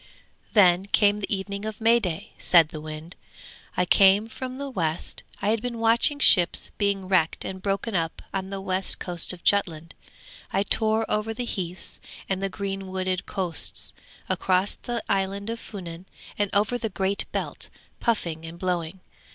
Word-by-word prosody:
'Then 190 -3 +5
came 205 0 +3
the 200 - -5
evening 200 0 -3
of 215 -1 -5
May 230 +1 +4
day!' 180 -7 -4
said 165 -3 +5
the 155 -1 -8
wind. 155 +2 -8 0.6
'I 180 - +3
came 195 +4 +5
from 255 +2 -6
the 280 0 -5
west; 170 - -2 0.2
I 205 - +2
had 220 0 +1
been 245 -1 -4
watching 230 +6 +3
ships 180 -11 +4
being 200 -2 0
wrecked 180 -4 +1
and 190 0 -6
broken 200 +3 -2
up 165 -2 -2
on 190 -1 -3
the 195 0 -5
west 190 0 +1
coast 175 -2 -1
of 180 -2 -9
Jutland. 170 -5 +1 0.6
I 195 - +1
tore 220 +2 +2
over 215 +1 -1
the 245 +1 -3
heaths 185 -5 -5 0.3
and 190 0 -2
the 195 - -1
green 195 0 -5
wooded 185 0 -2
coasts, 180 -5 +2 0.3
across 185 +1 +1
the 240 -2 -5
island 195 +2 -1
of 230 - -5
Funen 180 -4 -9 0.3
and 205 -1 0
over 210 +4 +1
the 225 - -2
Great 195 0 +4
Belt - - -4 0.3
puffing 170 -9 -1
and 165 +1 -8
blowing. 180 0 -3
195 Hz, 170 wpm, -25 LUFS, 180-215 Hz, 0.6 s, Then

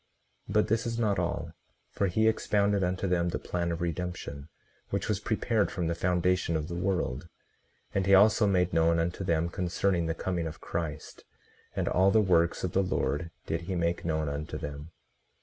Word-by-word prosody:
18:39 - - -4
But 105 - +3
this 115 +2 0
is 115 0 -2
not 105 -4 +1
all; - - -2 0.4
for 100 - 0
he 110 +5 +2
expounded 100 -2 +2
unto 90 +2 -1
them 85 -1 +1
the - - -2
plan 85 -1 -2
of 85 +1 -4
redemption, 85 -4 -4 0.4
which - - -2
was 105 -2 0
prepared 110 0 0
from 90 -3 -3
the 85 - 0
foundation 90 0 +1
of 75 -1 -1
the 85 - -6
world; 85 -6 -1 0.7
and 95 -1 0
he 100 - +7
also 105 +2 +5
made 90 -3 +2
known 85 0 +3
unto 85 +3 -1
them 85 -2 +1
concerning 90 -1 0
the 80 - -1
coming 85 -2 -2
of 80 - -8
Christ, 80 -3 -5 0.5
and - - -1
all 95 +2 +4
the 110 - +4
works 85 -5 +2
of 90 - -1
the 95 - +2
Lord 85 -3 -1 0.2
did 80 +1 -2
he 90 +2 -4
make 85 0 0
known 80 -2 -1
unto 70 +2 -4
them. 75 +2 -6
90 Hz, 190 wpm, -29 LUFS, 85-95 Hz, 0.7 s, he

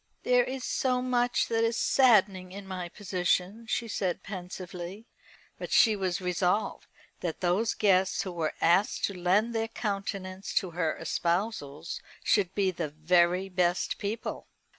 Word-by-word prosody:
"There 250 0 +4
is 260 +1 -5
so 255 -1 +1
much 245 -1 +1
that 225 0 +1
is 230 +1 +1
saddening 195 -8 +4
in 200 +1 -8
my 185 -2 -5
position," 185 +3 -1
she 235 - -1
said 190 -4 -2
pensively. 185 +1 -7 0.5
But - - -6
she 220 -2 +6
was 185 -3 -1
resolved 180 +2 0 0.3
that 170 -3 -4
those 185 +5 +1
guests 190 -2 +3
who 190 - -5
were 165 -3 -2
asked 175 +5 +3
to 200 - -4
lend 190 +6 +1
their 225 0 0
countenance 195 -3 -4
to 185 - +1
her 165 -2 -1
espousals 170 -4 -2 0.2
should 190 -3 +2
be 195 -2 +2
the 165 -3 -3
very 175 +4 +2
best 180 -1 0
people. 210 +3 -4
190 Hz, 145 wpm, -29 LUFS, 180-215 Hz, 0.5 s, she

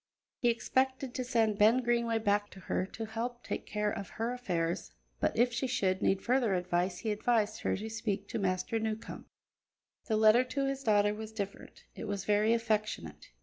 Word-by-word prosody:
He 240 - +3
expected 260 +2 0
to 255 - -2
send 225 -4 +1
Ben 225 +5 +5
Greenway 235 -1 +1
back 205 -1 +1
to 190 - -12
her 185 0 -1
to 225 +3 -6
help 235 +2 -4
take - - -4
care 210 0 0
of 200 - -5
her 230 +2 -2
affairs, 175 -9 -2 0.3
but - - 0
if 245 +1 +3
she 240 +3 -1
should 195 -7 0
need 190 0 +2
further 240 -5 +2
advice 180 0 0
he 220 - -2
advised 215 0 +1
her - - 0
to 215 +3 -5
speak 205 -3 -3
to - - -2
Master 190 +3 0
Newcombe. 220 0 -4 0.8
The 220 - +1
letter 220 +3 +6
to 275 +2 -2
his 275 0 -2
daughter 205 -4 +3
was 220 +1 -7
different; 200 -2 -6
it - - -7
was 200 -1 -3
very 210 +1 +3
affectionate. 215 - -1
220 Hz, 190 wpm, -32 LUFS, 200-240 Hz, 0.8 s, letter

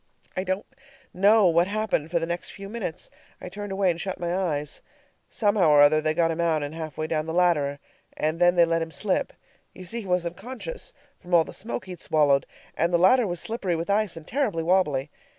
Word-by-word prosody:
I 185 - -1
don't 190 +1 -2 0.5
know 205 +3 +5
what 170 0 +4
happened 210 -7 -1
for 170 - 0
the 165 - 0
next 170 +1 -4
few 195 0 -9
minutes; 205 -7 -5 0.3
I - - -8
turned 205 +2 -7
away 195 -1 +2
and 170 - -5
shut 190 -1 -4
my 175 0 -2
eyes. 150 -6 -2 0.5
Somehow 205 -6 +2
or 145 -1 +7
other 155 +1 +5
they 155 0 0
got 165 0 +2
him 165 +1 -2
out 160 -3 +1
and 145 +1 -5
halfway 155 -2 -5
down 155 0 -2
the 160 - -3
ladder, 155 -6 +2 0.4
and 155 +2 -1
then 175 0 +4
they 170 -1 +6
let 165 0 0
him 165 - -3
slip. 185 - -1 0.4
You 185 - -10
see, 230 +6 -4
he 200 - -10
was 180 -1 +1
unconscious 250 - -7 0.3
from 175 0 -1
all 165 - +6
the - - -11
smoke 210 -3 -5
he'd 180 -2 -9
swallowed, 145 -3 +2 0.3
and 170 +2 +1
the 175 - +4
ladder 205 +7 +4
was 175 -2 -3
slippery 205 -6 -2
with 165 +4 -2
ice 205 -4 0
and 160 - -10
terribly 225 - -1
wobbly. 155 -6 +1
175 Hz, 220 wpm, -25 LUFS, 160-195 Hz, 0.5 s, or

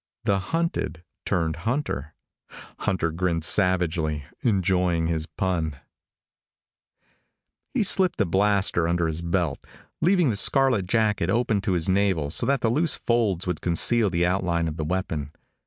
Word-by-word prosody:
The 100 -4 +1
hunted 95 - -2 0.2
turned 80 -2 0
hunter. 85 - -3 0.6
Hunter 85 -4 -1
grinned 85 -1 -1
savagely, 85 -6 +1 0.2
enjoying 90 -6 +1
his 80 -1 -2
pun. 85 -6 -2 2.0
He 240 - +2
slipped 190 -2 +3
the 100 - +2
blaster 95 -2 +1
under 85 0 +1
his 80 0 -2
belt, 85 -1 -1 0.4
leaving 175 -6 +3
the - - -2
scarlet 125 -3 +3
jacket 105 -4 +1
open 110 -1 +1
to 100 -2 -1
his 85 -3 0
navel 95 -6 +1
so - - +2
that 140 -1 +1
the 115 - +1
loose 155 +5 +1
folds 110 -7 0
would 90 -4 -3
conceal 105 +5 +2
the 90 -1 +1
outline 90 -2 0
of 80 - -4
the 80 - -3
weapon. 80 -4 -3
90 Hz, 140 wpm, -24 LUFS, 85-110 Hz, 2.0 s, slipped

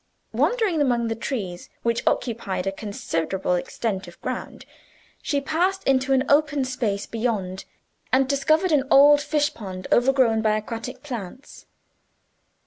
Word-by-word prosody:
Wandering 430 -10 +1
among 240 -4 +1
the 225 - -1
trees, 205 -7 -5
which 235 0 +1
occupied 200 -6 -1
a 195 - 0
considerable 195 -3 -2
extent 190 +2 -2
of - - -13
ground, - - -6 0.6
she 285 - 0
passed 360 +7 0
into 265 0 +2
an 265 -1 +4
open 290 -1 +3
space 225 -6 -2
beyond, 210 -5 -3 0.5
and 260 +1 +3
discovered 310 +6 +2
an 290 -3 +4
old 290 +1 +7
fish 295 0 0
pond, 185 -4 -8
overgrown 245 -3 +3
by 215 -1 +2
aquatic 230 +4 -6
plants. 245 -3 -8
245 Hz, 135 wpm, -24 LUFS, 210-280 Hz, 0.6 s, old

